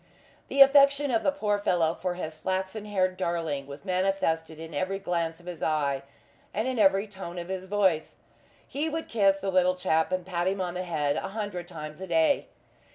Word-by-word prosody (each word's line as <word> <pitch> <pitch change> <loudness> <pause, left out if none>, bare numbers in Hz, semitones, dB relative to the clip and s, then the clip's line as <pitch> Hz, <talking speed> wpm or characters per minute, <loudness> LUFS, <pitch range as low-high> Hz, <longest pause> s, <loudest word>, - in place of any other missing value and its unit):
The 275 - +2
affection 280 0 +4
of 225 - +2
the 285 - +2
poor 210 -8 0
fellow 170 -5 +2
for 180 0 -3
his 160 -3 -5
flaxen 190 +4 -2
haired 185 -3 0
darling 165 -6 -2
was 140 0 -10
manifested 180 -4 0
in 160 0 -8
every 185 +6 -1
glance 170 -4 -2
of 175 - -18
his 175 -3 -7
eye, 140 -3 0 0.5
and 215 +4 0
in 255 -3 -1
every 195 0 +4
tone 190 -4 -8
of 175 +1 -6
his 190 0 -4
voice. 190 -6 +1 0.5
He 300 +3 -2
would 320 +1 -4
kiss 195 -3 +2
the 195 0 -1
little 185 0 +3
chap 160 -2 +1
and 185 -1 -1
pat 175 -1 -1
him 195 +1 0
on 180 -2 -2
the 180 +1 -4
head 150 -4 0
a - - -2
hundred 195 -5 -4
times 155 -1 -8
a 190 - -5
day. 165 - +2
185 Hz, 200 wpm, -28 LUFS, 165-200 Hz, 0.5 s, affection